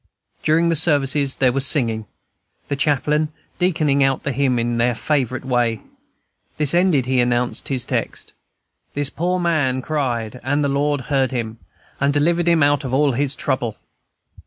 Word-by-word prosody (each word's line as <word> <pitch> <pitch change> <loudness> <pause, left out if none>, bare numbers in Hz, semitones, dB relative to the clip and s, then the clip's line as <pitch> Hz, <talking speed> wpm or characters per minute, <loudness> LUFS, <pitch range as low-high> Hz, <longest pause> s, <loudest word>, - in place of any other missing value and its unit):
During 165 +2 +2
the 165 - +2
services 145 -3 +2
there 130 -2 +3
was 135 +2 +1
singing, 115 -6 +1 0.6
the 140 - 0
chaplain 150 +2 +1 0.3
deaconing 155 -6 +2
out 135 -1 +1
the 140 - -1
hymn 130 -1 +1
in 120 0 -1
their 120 0 +2
favorite 130 -1 -1
way. 120 -4 0 0.8
This 150 -1 +2
ended, 175 -7 +3
he 130 0 +1
announced 120 0 0
his 130 -4 -1
text, - - -3 0.6
"This 145 -1 -1
poor 180 +3 -1
man 145 -7 0
cried, 125 -7 -2
and 145 +3 0
the 140 - +1
Lord 145 0 0
heard 135 0 0
him, 115 -3 -4 0.4
and 140 +1 +2
delivered 170 +4 +1
him 170 -3 +4
out 145 0 +2
of 130 -1 -2
all 145 0 +3
his 135 +2 -1
trouble." 120 -5 -2
140 Hz, 160 wpm, -20 LUFS, 125-150 Hz, 0.8 s, him